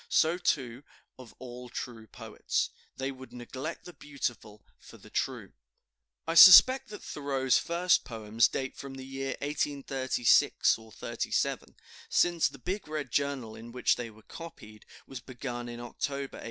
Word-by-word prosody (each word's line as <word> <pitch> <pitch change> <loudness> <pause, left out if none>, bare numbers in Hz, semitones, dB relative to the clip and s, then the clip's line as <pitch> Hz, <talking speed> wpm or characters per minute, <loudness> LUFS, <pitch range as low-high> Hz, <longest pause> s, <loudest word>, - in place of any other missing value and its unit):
So, 165 +3 +3
too, 130 -7 -1 0.4
of 125 -3 -13
all 125 -1 -9
true 115 -2 -7
poets, - - -3 0.3
they 135 +1 -2
would 130 -1 -12
neglect 130 +6 -7
the 175 - -10
beautiful 120 -8 -6
for - - -15
the - - -17
true." - - -3 0.7
I 165 - -1
suspect 255 +10 +9
that 210 - -9
Thoreau's 135 -3 0
first 170 +1 +2
poems 110 -1 +1
date 130 -1 -4
from 140 -1 -8
the 130 0 -8
year 135 0 -4
1836 135 -6 +2 0.2
37, - - -2 0.3
since 175 -2 +3
the - - -10
"big 185 +9 -4
red 150 -5 -4
journal," 140 -6 -1
in 115 +1 -11
which 125 +1 +2
they 120 -1 -6
were 110 0 -18
copied, 110 -11 -12 0.2
was 135 - -8
begun 120 -1 -6
in 120 0 -7
October, 140 +3 -5
1837. - - -10
130 Hz, 150 wpm, -29 LUFS, 120-150 Hz, 0.7 s, suspect